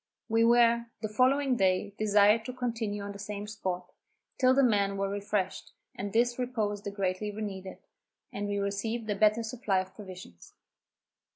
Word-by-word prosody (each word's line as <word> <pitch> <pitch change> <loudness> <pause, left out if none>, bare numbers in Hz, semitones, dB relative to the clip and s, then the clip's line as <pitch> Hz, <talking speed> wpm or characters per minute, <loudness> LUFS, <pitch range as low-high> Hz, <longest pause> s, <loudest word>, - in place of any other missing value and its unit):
We 225 0 +3
were, 235 0 +4 0.2
the - - +1
following 255 +4 +2
day, 190 0 +1
desired 210 +1 +4
to 255 - -5
continue 225 -5 -3
on 200 - -5
the 200 - -10
same 205 0 -5
spot, 185 -4 -4 0.5
till 255 -1 +5
the 275 - +5
men 200 -4 +2
were 195 0 0
refreshed, 200 -1 -3 0.2
and 200 +1 -5
this 240 +3 +2
repose 220 -5 -1
they 205 - -4
greatly 200 0 -2
needed, 195 -3 -6 0.6
and 205 0 -3
we 205 0 -1
received 205 +3 -2
a - - 0
better 215 +3 +3
supply 220 -3 -1
of 190 0 -5
provisions. 185 - -11
210 Hz, 165 wpm, -29 LUFS, 200-230 Hz, 0.6 s, till